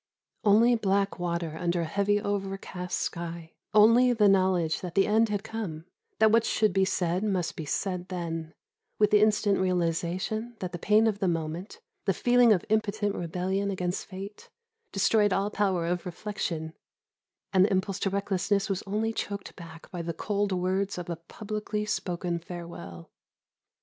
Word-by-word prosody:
Only 225 Hz, +3 st, +5 dB
black 200 Hz, -3 st, +1 dB
water 170 Hz, -2 st, -2 dB
under 175 Hz, 0 st, 0 dB
a -, -, -1 dB
heavy 200 Hz, +5 st, +1 dB
overcast 195 Hz, -3 st, -3 dB
sky; 170 Hz, -1 st, -5 dB, 0.2 s
only 230 Hz, +4 st, +6 dB
the 215 Hz, -3 st, +4 dB
knowledge 185 Hz, -4 st, +2 dB
that 175 Hz, -2 st, -6 dB
the 195 Hz, -, +5 dB
end 220 Hz, +1 st, +3 dB
had 205 Hz, -1 st, -2 dB
come; 180 Hz, -8 st, -5 dB, 0.3 s
that 220 Hz, 0 st, +5 dB
what 230 Hz, 0 st, +5 dB
should 215 Hz, -3 st, +1 dB
be 190 Hz, 0 st, +3 dB
said 180 Hz, -1 st, 0 dB
must 190 Hz, -5 st, -1 dB
be 160 Hz, -, -5 dB
said 180 Hz, +3 st, -2 dB
then, 165 Hz, -3 st, -5 dB, 0.4 s
with 210 Hz, -1 st, +3 dB
the 210 Hz, 0 st, +6 dB
instant 210 Hz, -2 st, +3 dB
realisation 185 Hz, +6 st, -1 dB
that 180 Hz, -1 st, -4 dB
the 175 Hz, -, -6 dB
pain 210 Hz, +4 st, +4 dB
of 210 Hz, -3 st, +1 dB
the 190 Hz, -, +1 dB
moment, 165 Hz, +3 st, -3 dB, 0.2 s
the 195 Hz, -3 st, +1 dB
feeling 245 Hz, -1 st, +5 dB
of 185 Hz, -4 st, +3 dB
impotent 215 Hz, -1 st, 0 dB
rebellion 185 Hz, +4 st, -2 dB
against 180 Hz, -2 st, -2 dB
fate, 195 Hz, +2 st, -9 dB, 0.4 s
destroyed 205 Hz, +1 st, +3 dB
all 195 Hz, +2 st, 0 dB
power 190 Hz, -5 st, +1 dB
of 175 Hz, +1 st, -2 dB
reflection, 170 Hz, -4 st, -4 dB, 0.8 s
and 185 Hz, -1 st, +6 dB
the 205 Hz, -, +2 dB
impulse 190 Hz, 0 st, 0 dB
to 195 Hz, -, 0 dB
recklessness 200 Hz, +1 st, 0 dB
was 190 Hz, -, -1 dB
only 220 Hz, +3 st, -1 dB
choked 200 Hz, -2 st, -5 dB
back 165 Hz, -2 st, -12 dB
by 175 Hz, -2 st, -4 dB
the 170 Hz, -1 st, -4 dB
cold 205 Hz, +2 st, -1 dB
words 190 Hz, +2 st, 0 dB
of 175 Hz, -1 st, -5 dB
a -, -, -2 dB
publicly 210 Hz, +5 st, -4 dB
spoken 175 Hz, -4 st, -2 dB
farewell. 165 Hz, -, -9 dB
195 Hz, 165 wpm, -28 LUFS, 175-210 Hz, 0.8 s, only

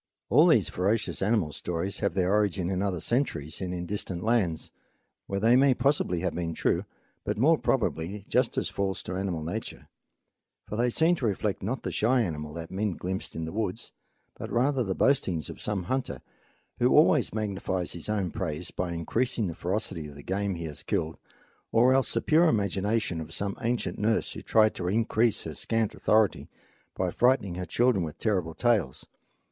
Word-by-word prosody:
All -, -, +7 dB
these -, -, +4 dB
ferocious 95 Hz, -3 st, -1 dB
animal 100 Hz, -6 st, +1 dB
stories 90 Hz, +5 st, -3 dB
have 100 Hz, -2 st, -1 dB
their 95 Hz, 0 st, +2 dB
origin 100 Hz, -4 st, +1 dB
in 95 Hz, 0 st, -1 dB
other 95 Hz, -3 st, -1 dB
centuries 80 Hz, -, -1 dB
and 90 Hz, -1 st, -3 dB
in 90 Hz, -1 st, -4 dB
distant 90 Hz, -2 st, -4 dB
lands, 105 Hz, -9 st, 0 dB, 0.6 s
where 100 Hz, -, -2 dB
they 115 Hz, +4 st, +5 dB
may 135 Hz, 0 st, +5 dB
possibly 135 Hz, -, +1 dB
have 90 Hz, -2 st, -1 dB
been 85 Hz, -2 st, -3 dB
true, -, -, 0 dB, 0.4 s
but -, -, -2 dB
more 150 Hz, +9 st, +5 dB
probably 100 Hz, -, -1 dB
are 105 Hz, -, -9 dB
just -, -, +1 dB
as -, -, +1 dB
false 95 Hz, -1 st, -2 dB
to 90 Hz, -, -5 dB
animal 90 Hz, -4 st, -2 dB
nature; 100 Hz, +8 st, -6 dB, 0.8 s
for -, -, -5 dB
they 120 Hz, +2 st, +2 dB
seem 160 Hz, +7 st, +3 dB
to 125 Hz, -, 0 dB
reflect 105 Hz, 0 st, -1 dB
not 115 Hz, +7 st, -3 dB
the -, -, -3 dB
shy 125 Hz, +3 st, +2 dB
animal 75 Hz, -5 st, -4 dB
that 85 Hz, 0 st, -7 dB
men 100 Hz, +1 st, -1 dB
glimpsed 95 Hz, +5 st, -5 dB
in 80 Hz, -, -3 dB
the 80 Hz, -, -5 dB
woods, 110 Hz, +1 st, -3 dB, 0.4 s
but -, -, -7 dB
rather 130 Hz, +2 st, +2 dB
the 95 Hz, -4 st, -2 dB
boastings 95 Hz, -, +1 dB
of -, -, -11 dB
some 105 Hz, -3 st, -2 dB
hunter, 130 Hz, +7 st, -3 dB, 0.6 s
who 125 Hz, -, +4 dB
always 150 Hz, -4 st, +5 dB
magnifies 95 Hz, -4 st, -2 dB
his 85 Hz, +4 st, -6 dB
own 100 Hz, -4 st, 0 dB
praise 90 Hz, -5 st, -4 dB
by 90 Hz, -1 st, -3 dB
increasing 110 Hz, +7 st, -1 dB
the 85 Hz, -, -3 dB
ferocity 90 Hz, -2 st, -3 dB
of 75 Hz, -, -11 dB
the 70 Hz, -, -11 dB
game 100 Hz, 0 st, -1 dB
he 85 Hz, -1 st, -5 dB
has 75 Hz, -2 st, -6 dB
killed, 80 Hz, +1 st, -2 dB, 0.5 s
or 125 Hz, +3 st, +5 dB
else 130 Hz, -3 st, +2 dB
the 115 Hz, -, 0 dB
pure 165 Hz, +2 st, +4 dB
imagination 100 Hz, -, 0 dB
of 80 Hz, +1 st, -8 dB
some 100 Hz, +4 st, -3 dB
ancient 120 Hz, +1 st, -1 dB
nurse 110 Hz, +1 st, +1 dB
who -, -, -7 dB
tried 110 Hz, -1 st, +4 dB
to 90 Hz, -, -4 dB
increase 115 Hz, +2 st, +1 dB
her -, -, -6 dB
scant 115 Hz, -2 st, -1 dB
authority 110 Hz, -2 st, +2 dB, 0.5 s
by 90 Hz, -1 st, -1 dB
frightening 120 Hz, -6 st, +2 dB
her 90 Hz, 0 st, -5 dB
children 120 Hz, 0 st, +2 dB
with 75 Hz, -3 st, -6 dB
terrible 90 Hz, -7 st, -1 dB
tales. 110 Hz, -, +1 dB
100 Hz, 190 wpm, -28 LUFS, 90-115 Hz, 0.8 s, All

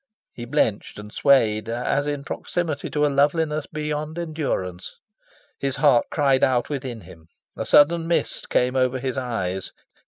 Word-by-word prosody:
He 120 Hz, -, -7 dB
blenched 120 Hz, -5 st, -1 dB
and 105 Hz, 0 st, -10 dB
swayed 115 Hz, -6 st, +3 dB
as 125 Hz, +5 st, -1 dB
in 145 Hz, -1 st, -3 dB
proximity 155 Hz, -1 st, -3 dB
to 150 Hz, 0 st, +1 dB
a -, -, +4 dB
loveliness 150 Hz, +2 st, +1 dB
beyond 150 Hz, +1 st, -4 dB
endurance. 145 Hz, -, -4 dB, 0.6 s
His 135 Hz, -1 st, -2 dB
heart 140 Hz, -6 st, +4 dB
cried 135 Hz, -3 st, +2 dB
out 125 Hz, -2 st, +2 dB
within 130 Hz, -5 st, -5 dB
him. 80 Hz, -2 st, -15 dB, 0.3 s
A -, -, -4 dB
sudden 165 Hz, +3 st, +5 dB
mist 170 Hz, -, -1 dB
came 125 Hz, +1 st, +1 dB
over 130 Hz, 0 st, +2 dB
his 130 Hz, -1 st, -3 dB
eyes. 95 Hz, -8 st, -3 dB
135 Hz, 150 wpm, -23 LUFS, 120-150 Hz, 0.6 s, sudden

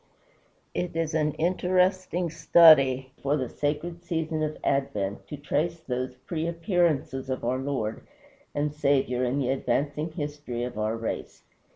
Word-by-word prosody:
It 175 Hz, -2 st, -3 dB
is 165 Hz, -1 st, -1 dB
an 150 Hz, -1 st, +1 dB
interesting 180 Hz, 0 st, +1 dB
study 150 Hz, -5 st, +6 dB
for 140 Hz, +2 st, +1 dB
the 130 Hz, -3 st, -2 dB
sacred 155 Hz, +6 st, -3 dB
season 160 Hz, -2 st, -2 dB
of 155 Hz, 0 st, -2 dB
Advent 105 Hz, -8 st, -1 dB
to 150 Hz, -, -6 dB
trace 150 Hz, +4 st, -1 dB
those 125 Hz, -3 st, -3 dB
pre 155 Hz, +6 st, -4 dB
appearances 165 Hz, -7 st, 0 dB
of 130 Hz, -2 st, -3 dB
our 125 Hz, +2 st, 0 dB
Lord 130 Hz, -6 st, -2 dB, 0.5 s
and 145 Hz, 0 st, 0 dB
Saviour 135 Hz, -4 st, +1 dB
in 125 Hz, +2 st, 0 dB
the 130 Hz, -3 st, 0 dB
advancing 145 Hz, +4 st, -1 dB
history 145 Hz, -6 st, -4 dB
of 125 Hz, -, -4 dB
our 110 Hz, +1 st, 0 dB
race. 115 Hz, 0 st, -5 dB
145 Hz, 145 wpm, -27 LUFS, 130-165 Hz, 0.5 s, study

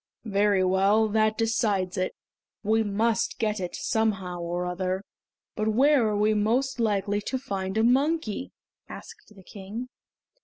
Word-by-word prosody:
"Very 200 Hz, -2 st, +2 dB
well, 195 Hz, +4 st, +3 dB
that 215 Hz, 0 st, +2 dB
decides 215 Hz, -5 st, 0 dB
it; 185 Hz, 0 st, -2 dB, 0.5 s
we 220 Hz, +2 st, +2 dB
must 220 Hz, +2 st, 0 dB
get 215 Hz, -2 st, -1 dB
it 180 Hz, -2 st, -4 dB
somehow 195 Hz, -5 st, -1 dB
or 175 Hz, +1 st, -3 dB
other. 185 Hz, +2 st, -2 dB, 0.5 s
But 215 Hz, -, -1 dB
where 255 Hz, +2 st, +4 dB
are 210 Hz, -1 st, 0 dB
we 210 Hz, +1 st, +3 dB
most 240 Hz, +5 st, 0 dB
likely 205 Hz, -2 st, 0 dB
to 260 Hz, +5 st, -3 dB
find 195 Hz, -6 st, -4 dB
a 220 Hz, -, +3 dB
monkey?" 265 Hz, -1 st, +1 dB, 0.4 s
asked 425 Hz, -, -12 dB
the 190 Hz, -, -15 dB
King. 210 Hz, +7 st, -8 dB
215 Hz, 145 wpm, -26 LUFS, 190-225 Hz, 0.5 s, where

